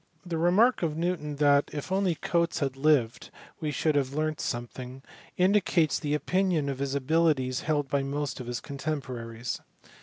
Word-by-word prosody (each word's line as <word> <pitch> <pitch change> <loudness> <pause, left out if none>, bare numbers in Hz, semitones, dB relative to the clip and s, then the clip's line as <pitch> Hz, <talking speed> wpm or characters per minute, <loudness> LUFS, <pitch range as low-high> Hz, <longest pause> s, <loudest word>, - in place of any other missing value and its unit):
Tin 165 -2 -2
remark 205 +9 +4
of 160 -3 -1
Newton 165 -4 -2
that 145 0 +4
if 150 +4 -6
only 190 -3 +2
Cotes 170 0 0
had 135 -2 -1
lived 135 -5 +2 0.2
" - - -25
we 155 - -1
should 155 +1 +1
have 140 -1 0
learnt 155 0 -1
some 120 0 -2
thing" 130 +2 -9 0.3
indicates 185 -4 +3
the 150 -2 -1
opinion 180 -2 +1
of 135 -1 -4
his 140 0 -1
abilities 140 -3 +2
held 150 -2 0
by 140 +1 +1
most 140 +1 -3
of 125 - -7
his 120 0 -3
contemporaries. 125 -5 -4
150 Hz, 175 wpm, -28 LUFS, 135-165 Hz, 0.3 s, remark